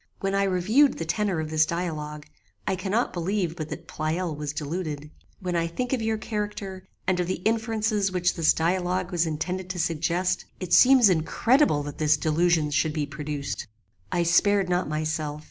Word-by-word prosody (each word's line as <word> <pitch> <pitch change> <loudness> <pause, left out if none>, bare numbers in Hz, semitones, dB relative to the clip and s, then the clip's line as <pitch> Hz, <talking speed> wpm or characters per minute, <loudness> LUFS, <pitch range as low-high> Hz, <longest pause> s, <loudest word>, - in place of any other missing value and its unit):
When 195 0 -1
I 195 0 +2
reviewed 205 +10 +3
the 165 - -3
tenor 195 0 0
of 155 0 -4
this 155 0 +4
dialogue, 155 -3 -4 0.4
I 190 - 0
cannot 195 +6 -1
believe 175 -1 -1
but 155 -3 -5
that - - -7
Pleyel 160 +2 -2
was 150 -1 -4
deluded. 150 -1 -4 0.3
When 180 -2 -3
I 170 0 +1
think 250 +10 -3
of 255 - 0
your 220 0 0
character, 205 -3 -5 0.2
and 185 -1 +1
of 175 - 0
the 185 - 0
inferences 220 -2 +1
which 180 -1 +1
this 165 -2 +3
dialogue 180 +2 0
was 170 -1 +1
intended 180 +4 -3
to 185 -1 -4
suggest, 170 +3 0
it 185 -2 -3
seems 260 -3 +7
incredible 185 - +2
that 145 0 -7
this 155 0 +3
delusion 160 0 +2
should 155 +1 +1
be 150 -2 -1
produced. 145 0 -5 0.4
"I 175 - +1
spared 190 +3 +3
not 180 -2 0
myself. 155 -1 -2
175 Hz, 180 wpm, -26 LUFS, 155-195 Hz, 0.4 s, seems